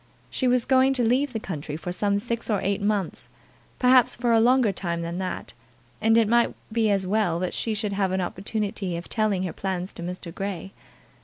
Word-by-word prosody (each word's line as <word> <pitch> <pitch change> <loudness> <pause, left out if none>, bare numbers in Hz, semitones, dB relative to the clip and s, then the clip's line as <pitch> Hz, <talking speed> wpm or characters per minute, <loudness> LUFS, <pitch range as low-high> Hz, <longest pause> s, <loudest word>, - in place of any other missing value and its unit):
She 260 - 0
was 245 -1 +3
going 265 0 +4
to 250 - +1
leave 255 +5 +2
the 225 - -3
country 155 -7 -5
for 175 +2 -5
some 200 +2 +1
six 235 +2 -3
or 210 -3 +2
eight 200 +2 0
months, 205 -3 -1 0.5
perhaps 255 -1 +5
for 240 0 0
a 225 - +5
longer 245 -1 +4
time 170 -3 -3
than 170 +2 -4
that, 185 -1 -4 0.5
and 225 +1 +4
it 225 -2 +4
might 235 +2 +3 0.2
be 225 -2 +2
as 195 -2 +1
well 195 -3 +1
that 180 +1 -2
she 225 -2 -1
should 210 -1 -2
have 195 -2 0
an 190 - 0
opportunity 195 0 -2
of 170 - -7
telling 215 -4 +1
her 180 - -3
plans 190 -1 -3
to - - -9
Mr. 175 -1 -6
Grey. 195 -1 -5
205 Hz, 210 wpm, -25 LUFS, 185-230 Hz, 0.5 s, perhaps